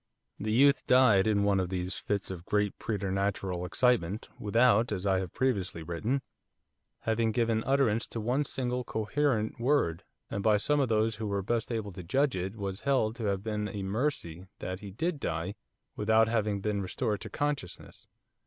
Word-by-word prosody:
The 110 +1 -2
youth 140 +5 +4
died 115 -6 +5
in 100 -2 +2
one 100 -1 +3
of 90 -2 -1
these 90 0 -2
fits 100 -2 -2
of 90 -2 -8
great 105 -1 0
preternatural 95 -3 -1
excitement, 110 -2 +1
without, 115 +1 +3
as 100 -1 -3
I 95 -1 +3
have 95 -2 -4
previously 100 -10 -1
written, 110 - -2 0.8
having 115 0 +1
given 115 -1 +1
utterance 135 -5 +2
to 115 - -5
one 125 +6 +1
single 125 -2 -2
coherent 110 0 0
word, 120 - +1 0.3
and 100 - -2
by 105 0 +4
some 145 +8 +1
of 135 -3 +1
those 110 0 +1
who 110 -1 -3
were 100 -1 -1
best 115 +3 -1
able 110 -3 -2
to 90 0 -8
judge 135 - +1
it 95 +3 -3
was 100 -2 -4
held 130 -6 +1
to 115 - -3
have 100 -1 -1
been 105 -1 -2
a 100 -1 -5
mercy 95 - -2
that 95 0 -5
he 100 - -8
did 155 - -2
die 85 -2 -2 0.4
without 110 +1 +3
having 105 -3 0
been 105 0 -1
restored 105 +2 -2
to - - -6
consciousness. 145 - -4
105 Hz, 180 wpm, -30 LUFS, 95-120 Hz, 0.8 s, died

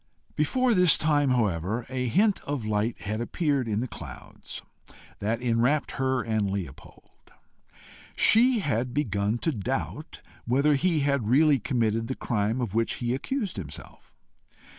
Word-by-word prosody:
Before 250 - +2
this 180 -4 +5
time 145 -3 +2
however 110 -2 0
a 125 -1 -2
hint 200 - +3
of 140 -6 -3
light 110 +2 -1
had 110 +2 -3
appeared 140 0 0
in 105 0 -1
the 130 - -2
clouds - - -9 0.6
that 115 +4 -2
enwrapped 125 +5 +1
her 130 -2 0
and 110 -3 0
Leopold: 95 -8 -8 0.8
she 235 +1 +4
had 125 - -1
begun 105 -6 0
to 160 - -1
doubt 105 -9 -4 0.2
whether 140 +5 +3
he 160 +2 +1
had 140 -5 0
really 145 +2 +5
committed 115 -2 0
the 130 - -3
crime 110 +2 -1
of 115 -6 -3
which 115 +1 +1
he 120 0 -2
accused 205 - -3
himself. 75 -7 -9
125 Hz, 140 wpm, -27 LUFS, 110-145 Hz, 0.8 s, this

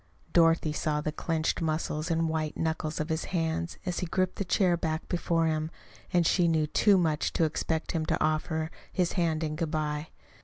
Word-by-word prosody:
Dorothy 165 -2 +4
saw 150 -1 0
the 155 +1 -2
clenched 160 +2 -1
muscles 155 0 -1
and 165 0 +1
white 160 -1 -2
knuckles 160 -1 -2
of 155 +2 -2
his 160 0 -1
hands 165 -1 -2
as 180 -1 -1
he 180 - -2
gripped 185 +2 0
the - - 0
chair 180 -1 +3
back 160 -1 -2
before 170 -2 +1
him; 155 0 0 0.4
and 175 -1 +3
she 175 +1 +3
knew 160 -2 +2
too 200 +6 +4
much 160 -4 +1
to - - +2
expect 160 0 -1
him 160 -2 -1
to - - +1
offer 155 +1 0 0.2
his 180 -3 +1
hand 165 -3 0
in 155 -1 -2
good 165 0 -2
bye. 150 -1 -2
160 Hz, 195 wpm, -29 LUFS, 155-170 Hz, 0.4 s, Dorothy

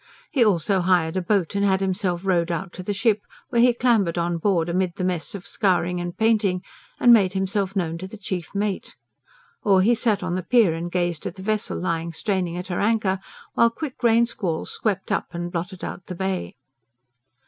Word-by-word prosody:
He 265 -5 +4
also 195 -2 +2
hired 175 -2 +2
a 185 - +1
boat 185 -2 0
and 200 0 0
had 190 -1 +3
himself 190 -1 -1
rowed 175 -3 +2
out 175 +2 -3
to - - -7
the 185 - -3
ship, 210 +1 +2 0.3
where 235 -3 +2
he 245 +1 +6
clambered 230 -8 +2
on 170 0 0
board 175 -3 +1
amid 175 0 0
the - - -4
mess 180 0 -2
of 195 - -8
scouring 180 -3 0
and 175 0 -5
painting, 210 -5 +2 0.4
and 240 - +7
made 195 -5 +4
himself 195 0 -1
known 165 -3 -1
to 185 - -6
the 220 - -10
chief 185 -3 -5
mate. 200 -1 -2 0.7
Or 195 -2 +4
he 235 +4 +4
sat 220 -4 +1
on 180 -1 -2
the 185 - -1
pier 205 -1 +4
and 170 +1 -4
gazed 175 -3 -1
at - - -6
the 190 - -9
vessel 215 +1 -1
lying 170 -2 -2
straining 180 -2 -1
at 180 - -5
her 180 -2 -3
anchor, 205 -3 +1 0.3
while 235 - +4
quick 260 +3 -7
rain 235 -1 +4
squalls 180 -8 -3
swept 210 -4 -2
up - - 0
and 175 0 -4
blotted 180 +2 -5
out 185 - -6
the 180 - -5
Bay. 190 - -3
190 Hz, 205 wpm, -23 LUFS, 175-210 Hz, 0.7 s, and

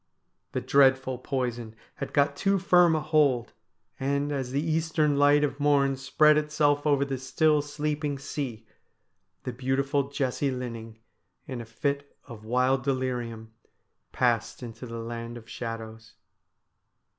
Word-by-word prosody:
The 130 - -1
dreadful 130 -1 +3
poison 120 -4 -3 0.2
had - - -5
got 140 -1 +2
too 195 +6 +2
firm 180 -3 +5
a 155 - 0
hold, 150 -6 +2 0.5
and, 140 +2 0
as 135 -3 -2
the 135 +2 -1
eastern 160 -1 +1
light 145 +1 +5
of 145 -1 -1
morn 140 -2 +3
spread 150 +3 +4
itself 150 -1 +1
over 140 -1 +3
the 135 -2 -3
still 150 +3 +2
sleeping 150 0 -3
sea, 130 -5 -5 0.8
the 125 - -4
beautiful 135 +2 0
Jessie 140 0 -1
Linning, 115 -3 -6 0.5
in 130 -3 -5
a - - -8
fit 140 +5 -3
of 115 -5 -11
wild 125 +2 +2
delirium, 120 -4 -3 0.6
passed - - 0
into 120 +1 -8
the 115 0 -6
land 115 +1 -6
of 115 -1 -13
shadows. 115 -1 -7
135 Hz, 135 wpm, -27 LUFS, 120-145 Hz, 0.8 s, firm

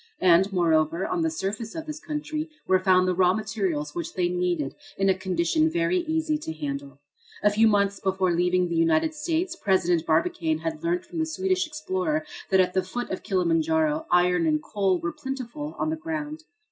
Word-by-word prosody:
And, 185 +2 +5
moreover, 165 -1 +2
on 360 -2 -1
the 325 - +2
surface 220 -5 -4
of 320 -1 -5
this 305 -1 -6
country 305 0 -4 0.2
were 185 0 +3
found 185 -1 +4
the 185 - +2
raw 180 0 +3
materials 190 -9 -2
which 170 -2 -5
they 180 -1 +1
needed 175 -5 -1 0.2
in 195 0 +2
a - - +6
condition 185 - +1
very 345 +2 +1
easy 320 -2 -1
to 300 - -5
handle. 140 -2 -5 0.4
A 210 - +5
few 220 +2 +4
months 200 -2 +2
before 190 -1 +1
leaving 180 +1 +2
the 170 - -3
United 165 - +2
States 330 +3 -1
President 180 - +1
Barbicane 320 - +1
had 320 0 -4
learnt 350 +1 0
from 340 -1 -6
the 320 - 0
Swedish 370 +1 0
explorer 310 0 -2 0.2
that 190 - +4
at 180 -1 +3
the 190 - +2
foot 240 +7 -5
of 185 - -3
Kilimanjaro 160 -4 +1
iron 180 -1 +3
and 155 -1 +2
coal 195 -3 +1
were 170 0 -3
plentiful 270 +3 -6
on 315 - -1
the - - 0
ground. 315 -1 -5
195 Hz, 190 wpm, -26 LUFS, -, 0.4 s, a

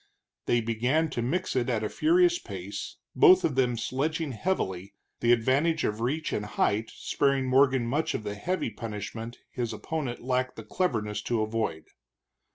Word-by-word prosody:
They 120 - +3
began 125 +8 +1
to 120 - -2
mix 170 +10 -1
it 125 -1 +1
at 115 -3 0
a - - +1
furious 350 - +3
pace, - - -7 0.2
both 375 -3 +7
of 150 - +1
them 125 -2 +1
sledging 150 +6 -1
heavily, 100 - -2 0.2
the 120 - +3
advantage 140 +7 +2
of 105 +1 -1
reach 150 +6 -1
and 105 - -1
height 105 +1 0
sparing 140 -1 0
Morgan 130 -1 +4
much 145 +7 0
of - - -3
the 105 -1 -3
heavy 155 - -2
punishment 110 +2 -6
his 120 -3 -3
opponent 145 -7 -4
lacked 130 0 0
the 110 - -8
cleverness 105 - -1
to 115 0 0
avoid. 110 -7 -2
125 Hz, 165 wpm, -28 LUFS, 110-155 Hz, 0.2 s, both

